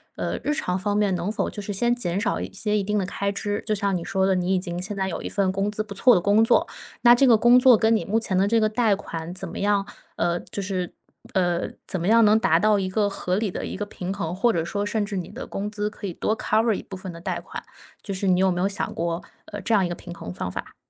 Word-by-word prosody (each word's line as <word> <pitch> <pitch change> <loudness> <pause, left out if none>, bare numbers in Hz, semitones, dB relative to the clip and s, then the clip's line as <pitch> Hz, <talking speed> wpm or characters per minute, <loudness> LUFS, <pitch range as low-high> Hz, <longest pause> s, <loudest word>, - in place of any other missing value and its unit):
呃， - - -3
日 295 - +1
常 180 -10 -1
方 205 +2 -1
面 205 -3 +2
能 175 +4 -2
否 - - -1
就 205 - -7
是 205 - -5
先 240 +5 +1
减 190 -6 -2
少 210 - -1
一 - - -5
些 210 -1 -1
一 205 - 0
定 210 +2 -1
的 190 - -1
开 200 +1 -2
支。 205 +1 -3
就 215 - 0
像 200 -2 0
你 175 - -3
说 190 +2 0
的， 190 0 +2
你 180 +1 0
已 185 - +2
经 175 -1 -4
现 200 +3 -4
在 190 -1 -1
有 170 - -4
一 - - -5
份 195 -2 +1
工 195 +2 -1
资 215 +1 -2
不 210 -2 -6
错 245 +5 +5
的 - - +4
工 205 +4 +4
作， - - +4 0.4
那 240 0 +8
这 270 - +4
个 230 -3 +7
工 240 +3 +6
作 250 -2 +7
跟 220 +2 +3
你 220 - 0
目 215 +3 +1
前 190 -5 -1
的 195 - +4
这 225 +2 +3
个 215 - +4
贷 220 -1 +2
款， 165 -3 -6
怎 190 +1 -5
么 - - -7
样？ 200 -1 +1 0.3
呃， 175 0 +1
就 200 - -6
是 185 -2 -3 0.4
呃， 175 -2 +1 0.2
怎 185 - -2
么 175 - 0
样 230 0 +6
能 215 +1 +5
达 165 -6 +3
到 210 +2 +3
一 190 -1 -1
个 205 +2 +1
合 185 -1 -2
理 215 -2 0
的 - - -5
一 - - -5
个 205 - -3
平 190 -2 -5
衡， 175 -4 -3
或 235 +5 +3
者 165 -6 -1
说 205 +3 -2
甚 210 0 -1
至 205 - -5
你 180 -3 -4
的 - - -8
工 205 +1 -4
资 210 -1 -2
可 205 - -9
以 190 - -3
多 220 - -1
cover 220 +1 +2
一 - - -4
部 190 - -8
分 185 0 -8
的 170 - -10
贷 - - -3
款， - - -8 0.4
就 200 - -4
是 195 +1 -2
你 185 0 +3
有 190 0 +4
没 175 - -2
有 185 - +2
想 200 - -2
过 170 +1 -2 0.2
呃， 205 - -7
这 230 - 0
样 200 -3 +4
一 - - -1
个 175 - -4
平 175 0 -9
衡 90 - -8
方 90 0 -4
法？ - - -7
200 Hz, 330 characters per minute, -24 LUFS, 185-215 Hz, 0.4 s, 那